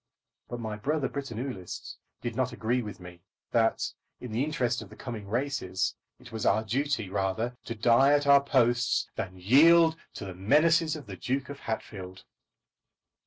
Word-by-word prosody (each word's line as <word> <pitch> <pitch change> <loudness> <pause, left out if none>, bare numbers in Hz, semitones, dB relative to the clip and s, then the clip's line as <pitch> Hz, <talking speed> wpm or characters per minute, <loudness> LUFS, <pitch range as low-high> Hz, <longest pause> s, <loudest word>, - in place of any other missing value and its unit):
But 120 - -5
my 110 -2 -4
brother 140 +6 0
Britannulists 125 -7 -6 0.2
did 120 -1 -4
not 130 0 0
agree 120 +3 0
with 105 -4 -7
me 90 -1 -12 0.3
that, 115 -1 +1 0.3
in 125 - -7
the 115 +5 0
interest 125 -6 -1
of 105 - -10
the 105 - -13
coming 110 -4 -7
races, 110 -6 -1 0.3
it 120 - -14
was 110 -1 -4
our 110 +2 +3
duty 125 0 -1
rather 100 +5 -1
to 115 - -4
die 120 +5 +5
at 145 0 +2
our 140 0 +7
posts 125 -3 +2
than 95 -1 -5
yield 160 - +6 0.2
to - - -6
the 95 - -6
menaces 155 - +3
of 150 - -8
the 95 -3 -8
Duke 130 +4 -2
of 140 0 -7
Hatfield. 95 -4 -6
120 Hz, 165 wpm, -28 LUFS, 105-140 Hz, 0.3 s, our